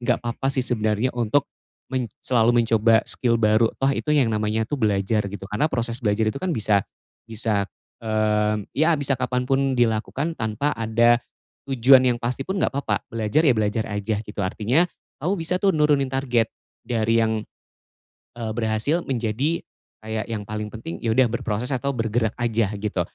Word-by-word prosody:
enggak 120 0 0
papa 120 +3 -2
sih 130 -2 0
sebenarnya 110 +1 0
untuk 120 +4 +1 0.4
men 125 -4 -3
selalu 120 -2 +2
mencoba 115 -1 +4
skill 115 -2 +1
baru 110 +1 +3
toh 135 +1 +2
itu 150 - -3
yang 145 -5 +4
namanya 110 0 0
tuh 145 - -2
belajar 105 -3 +1
gitu, 100 -1 -7
karena 110 +10 0
proses 115 0 -2
belajar 110 +1 +1
itu 110 - 0
kan 185 - 0
bisa 105 - +2 0.5
bisa, 110 -2 0 0.4
eee, 105 -1 +1
ya 155 +4 +3
bisa 140 -1 +1
kapan 125 0 -2
pun 135 -1 +1
dilakukan 120 +8 0
tanpa 110 +6 -1
ada 115 +1 +3 0.5
tujuan 130 +1 +6
yang 125 -2 +2
pasti 125 +3 -2
pun 190 +6 -3
enggak 140 - 0
papa, 140 - 0
belajar, 115 +8 +1
ya 130 - +5
belajar 110 +1 0
aja 105 +1 -2
gitu. 105 0 -12
Artinya, 110 - +1 0.4
kamu 185 +5 +1
bisa 165 +3 0
tuh 195 - +5
nurunin 150 -3 +3
target, 125 -4 0 0.3
dari 115 -1 +1
yang, 110 -1 -1 0.9
eee, 110 -2 -3
berhasil 115 +9 0
menjadi, 130 +6 -1 0.4
kayak 110 0 -3
yang 105 -2 -4
paling 105 0 -4
penting 85 -7 -7
ya 115 - -1
udah 130 - +6
berproses 115 +1 -2
atau 140 +2 -1
bergerak 115 -1 0
aja, 115 -3 0
gitu. 100 -3 -2
115 Hz, 170 wpm, -23 LUFS, 110-130 Hz, 0.9 s, tujuan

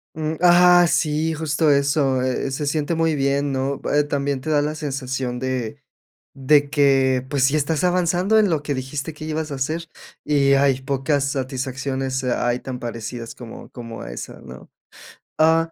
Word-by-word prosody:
Mm, 155 0 -2
ajá, 175 0 +6
sí, 155 +1 0
justo 155 0 0
eso, 140 -2 +2
eh, 130 +1 -1
se 140 +3 -3
siente 150 +3 -1
muy 165 -1 +1
bien, 140 0 0
¿no?, 135 +1 -2
eh, 150 0 +4
también 140 -2 -2
te 155 - -5
da 145 -1 +3
la 150 +1 -2
sensación 135 -4 -3
de 130 -3 -3 0.6
de 145 +1 +4
que, 135 -3 +3
pues, 140 -3 0
sí 140 +3 +2
estás 155 +3 -1
avanzando 180 +3 +2
en 210 -3 +3
lo 155 -3 0
que 145 -1 -2
dijiste 135 +4 -4
que 155 +1 -9
ibas 155 0 -3
a 140 - -3
hacer, 155 +5 -3 0.4
y 140 -2 +3
hay 135 -1 +3
pocas 135 +1 0
satisfacciones, 130 0 -3
ay, 120 -1 0
tan 130 -1 -6
parecidas 115 0 -6
como 120 -2 -10
como 115 -2 -8
a - - -7
esa, - - -8
¿no?, 65 -1 -12 0.7
ah 165 +1 +3
140 Hz, 170 wpm, -22 LUFS, 130-155 Hz, 0.7 s, ajá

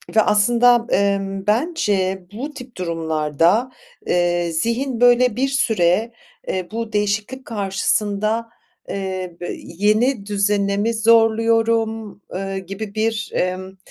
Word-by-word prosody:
ve 220 - +7
aslında, 240 +3 +4
emm, 195 -1 0
bence 210 - 0
bu 280 +7 -5
tip 250 -5 -11
durumlarda, 165 - 0 0.4
eee, 175 -1 +1
zihin 235 - -1
böyle 245 -1 +5
bir 265 +2 +1
süre, 220 -5 +1 0.4
eee, 185 -2 -2
bu 230 -1 -4
değişiklik 210 +5 -1
karşısında, 210 +2 -1 0.4
eee, 185 -3 -4
be, 175 - -4
"Yeni 210 +5 +1
düzene 200 -1 +1
mi 225 +3 +1
zorluyorum?" 225 -1 +2
eee, 195 +1 -3
gibi 200 +3 -7
bir, 220 0 -1
emm, 185 +1 -2
210 Hz, 110 wpm, -20 LUFS, 190-230 Hz, 0.4 s, ve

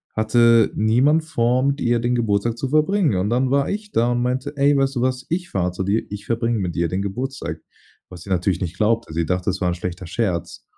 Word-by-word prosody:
hatte 115 0 +4
niemand 130 +9 +3
vor, 125 -4 +1
mit 140 +1 0
ihr 120 0 +2
den 120 +1 0
Geburtstag 115 0 0
zu 130 +1 -3
verbringen 155 - +2
und, 95 +3 0
dann 125 +1 +1
war 140 0 +1
ich 210 0 -4
da 120 +2 +2
und 120 0 0
meinte: 130 +4 -2
„Ey, 140 +1 +3
weißt 135 -1 0
du 120 - 0
was, 130 0 -1
ich 175 +1 -2
fahre 90 -2 -1
zu 90 +1 -4
dir, 100 +4 0
ich 105 0 -7
verbringe 115 -1 0
mit 90 -3 -3
dir 85 0 +1
den 90 +4 -2
Geburtstag“, 100 - -4 0.5
was 90 -2 -11
sie 100 - -12
natürlich 90 0 0
nicht 90 0 -4
glaubte. 115 -2 +1
Sie 85 0 0
dachte, 90 +1 -2
das 95 -1 -1
war 90 - +1
'n 85 - -1
schlechter 90 +1 -6
Scherz, 90 -2 -3
115 Hz, 235 wpm, -21 LUFS, 95-130 Hz, 0.5 s, hatte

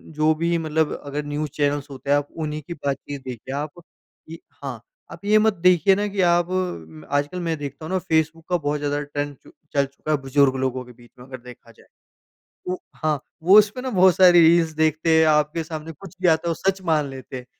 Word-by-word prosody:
जो 155 +1 +3
भी 170 +1 0
मतलब 160 -1 0
अगर 145 +1 -4
न्यूज़ 145 +1 -3
चैनल्स 145 -1 -1
होते 140 +1 -9
हैं, 145 - +5
आप 145 0 -2 0.2
उन्हीं 155 0 -4
की 170 - -5
बातचीत 140 -2 -5
देखिए।" 130 +1 -7
आप 150 +4 -5 0.5
इ 165 - -8 0.3
हाँ, - - -5 0.3
आप - - -11
ये 210 +1 +5
मत 220 -1 +3
देखिए 180 +1 +4
ना, 205 +1 -1
कि 200 -1 -2
आप 175 0 +3 0.6
आजकल 145 +5 -1
मैं 165 -2 -2
देखता 145 +2 -7
हूँ 185 - -6
ना, 185 - +2
फेसबुक 160 -1 -1
का 180 - +2
बहुत 150 -2 -2
ज़्यादा 145 0 -1
ट्रेंड 145 0 -4
चु - - -17 0.2
चल 140 -1 +2
चुका 140 +3 -6
है, 150 - +3
बुज़ुर्ग 135 0 +2
लोगों 130 0 -2
के 125 - -14
बीच 120 -1 -20
में, 125 - -12
अगर 130 0 -8
देखा 125 -1 -14
जाए। 115 - -22 0.9
ओ - - -1 0.3
हाँ, 155 -2 +1 0.2
वो 190 +5 +7
उसपे 210 +4 0
ना, 260 - -3
बहुत 185 -5 +4
सारी 175 -2 +7
रील्स 165 -1 +4
देखते 160 +1 +2
हैं, 160 - +5
आपके 150 +2 +2
सामने 160 0 -7
कुछ 190 +5 -13
भी 185 - +3
आता 160 +1 +2
है, - - +1
वो - - +1 0.2
सच 195 0 -3
मान 150 -3 +1
लेते 130 0 -8
हैं। 125 - -10
155 Hz, 225 wpm, -23 LUFS, 145-170 Hz, 0.9 s, वो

